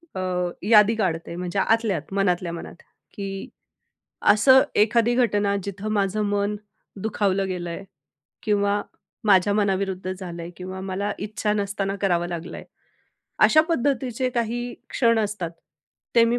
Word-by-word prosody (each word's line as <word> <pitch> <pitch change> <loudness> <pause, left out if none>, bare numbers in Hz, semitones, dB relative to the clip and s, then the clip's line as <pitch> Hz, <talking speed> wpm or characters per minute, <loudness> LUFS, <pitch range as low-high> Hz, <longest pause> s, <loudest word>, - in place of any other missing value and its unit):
अ, - - -3 0.4
यादी 210 +1 +6
काढते. 170 -5 -2
म्हणजे 180 +2 -3
आतल्या 225 -4 +2
आत, 155 +5 -9
मनातल्या 180 -3 +1
मनात, 170 - -8 0.4
की 195 -1 -6 0.8
असं 260 +5 +6 0.2
एखादी 230 +2 +2
घटना, 205 -5 +2
जिथं 200 +1 -5
माझं 205 +1 0
मन 205 +1 0 0.5
दुखावलं 195 -2 0
गेलंय 175 0 -4 0.6
किंवा 205 -1 +1 0.4
माझ्या 200 0 +4
मनाविरुद्ध 190 -2 0
झालंय 175 -3 -7
किंवा 185 +1 -6
मला 195 +2 -2
इच्छा 210 +1 -2
नसताना 200 -1 -2
करावं 175 -3 +1
लागलंय. 170 0 -6 0.8
अशा 310 - +6
पद्धतीचे 260 -4 0
काही 240 0 -2 0.2
क्षण 230 -2 +3
असतात, 210 -5 -2 0.6
ते 230 -1 +7
मी 235 +1 +1
200 Hz, 125 wpm, -24 LUFS, 185-220 Hz, 0.8 s, ते